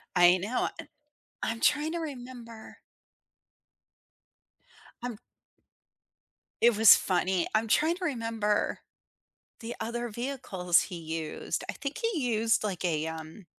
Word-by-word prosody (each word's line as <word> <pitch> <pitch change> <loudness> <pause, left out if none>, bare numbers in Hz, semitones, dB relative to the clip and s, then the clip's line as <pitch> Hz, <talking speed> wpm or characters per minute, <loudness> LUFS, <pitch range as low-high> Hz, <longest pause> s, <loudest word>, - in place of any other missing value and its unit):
I 175 +1 +7
know 210 +7 -1
an - - -7 0.6
I'm 225 0 -1
trying 295 +2 +2
to 340 - -2
remember. 245 -6 -8 2.2
I'm 245 -4 -5 1.4
It 235 -1 +5
was 220 0 +9
funny. 185 -1 0
I'm 225 +1 +2
trying 315 +9 +3
to 365 - -4
remember 225 -7 -1 0.8
the 230 +1 -5
other 240 +2 -3
vehicles 220 -8 0
he 180 - -6
used. 160 -1 -4
I - - -1
think 280 -1 -5
he 455 -9 -1
used 225 0 +2
like 190 -4 -2
a, 160 -2 0
um 160 +4 -8
225 Hz, 120 wpm, -29 LUFS, 180-250 Hz, 2.2 s, was